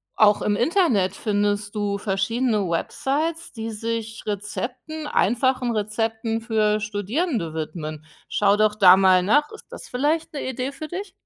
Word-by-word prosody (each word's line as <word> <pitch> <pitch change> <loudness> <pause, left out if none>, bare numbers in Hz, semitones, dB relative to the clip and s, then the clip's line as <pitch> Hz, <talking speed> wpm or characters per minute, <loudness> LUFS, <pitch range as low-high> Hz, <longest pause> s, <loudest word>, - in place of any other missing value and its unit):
Auch 210 -1 +5
im 205 - +1
Internet 240 - +2
findest 205 0 -1
du 205 -1 -1
verschiedene 210 +2 0
Websites, 295 - -2
die 225 -1 -5
sich 225 0 -4
Rezepten, 245 +9 -5
einfachen 250 -1 +1
Rezepten 225 +2 -2
für 215 -2 +1
Studierende 210 - -2
widmen. 155 -1 -5 0.2
Schau 205 0 +2
doch 215 0 +3
da 190 -3 +7
mal 185 -1 +5
nach, 290 +11 +2
ist 435 - -12
das - - -10
vielleicht 300 +6 -1
'ne 280 -3 -4
Idee 255 +1 -3
für 280 +3 -7
dich? 375 +6 -6
220 Hz, 145 wpm, -23 LUFS, 205-260 Hz, 0.2 s, da